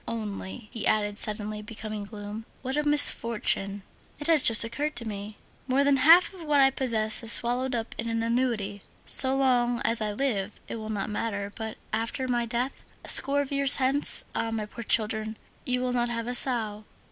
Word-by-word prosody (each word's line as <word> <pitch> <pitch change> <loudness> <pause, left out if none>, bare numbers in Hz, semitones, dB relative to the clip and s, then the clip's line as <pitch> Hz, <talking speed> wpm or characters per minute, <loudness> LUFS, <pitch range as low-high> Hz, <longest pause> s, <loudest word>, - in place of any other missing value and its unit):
Only," 210 0 -7
he 225 - -3
added, 205 -1 -1
suddenly 210 0 +2
becoming 215 -1 -8
gloomy, 210 +1 -9 0.2
"what 260 +1 -4
a 300 - 0
misfortune! 220 -8 +3 0.3
It 295 - -8
has 320 -3 +4
just 230 -3 +5
occurred 295 +7 -4
to 235 -1 -5
me! 205 0 -8 0.3
More 270 +2 +1
than 280 -1 +2
half 330 +8 +5
of 365 -3 -11
what 300 -2 +1
I 270 0 +4
possess 225 -5 -2
is 230 -1 -2
swallowed 250 +2 +1
up 225 -1 -5
in 230 0 -4
an 230 0 -2
annuity; 230 -4 -2 0.2
so 265 0 +4
long 245 -3 +1
as 230 -1 0
I 210 -1 -2
live, 210 -5 -3
it - - -7
will 215 -1 -8
not 210 -1 -4
matter, 205 -2 -5
but 220 -1 -7 0.2
after 230 +4 -3
my 240 -1 -2
death, 245 +3 -4 0.2
a - - -2
score 280 +1 +7
of 280 - -7
years 280 -1 +6
hence, 270 +2 +3
ah! 225 - -3
my 225 -1 -4
poor 235 +3 -10
children, 220 0 0 0.3
you 250 0 -1
will 250 -1 -2
not 240 -1 -1
have 230 -1 -4
a 245 - -4
sou! 225 -5 +1
230 Hz, 195 wpm, -26 LUFS, 215-260 Hz, 0.3 s, score